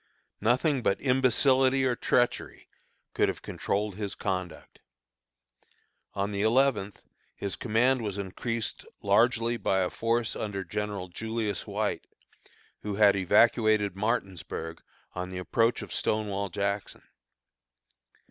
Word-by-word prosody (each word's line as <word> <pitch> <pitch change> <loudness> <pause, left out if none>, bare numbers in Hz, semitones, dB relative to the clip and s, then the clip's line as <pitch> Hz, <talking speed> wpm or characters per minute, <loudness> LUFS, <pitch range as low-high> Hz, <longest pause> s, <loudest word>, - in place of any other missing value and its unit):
Nothing 130 +5 +2
but 100 - +1
imbecility 130 0 +3
or 125 -2 +2
treachery 120 +1 0 0.5
could - - +2
have - - -5
controlled 100 -1 -2
his 105 -2 -3
conduct. 95 -4 -4 1.4
On 100 +1 -1
the 100 -1 -2
eleventh 110 -3 +2 0.3
his 100 - -4
command 125 +3 +2
was 105 -3 -3
increased 110 +4 -3 0.2
largely 115 +3 +3
by 95 -4 +1
a 90 - 0
force 115 0 0
under 100 -2 -3
General 100 0 -4
Julius 110 +3 -3
White, - - -2 0.7
who 105 -1 -3
had 100 -1 +5
evacuated 105 +1 +3
Martinsburg 95 -6 -3 0.3
on 90 0 -4
the 95 - -6
approach 115 +6 +1
of - - -8
Stonewall 100 -2 -1
Jackson. 100 +2 -3
105 Hz, 115 wpm, -28 LUFS, 100-120 Hz, 1.4 s, had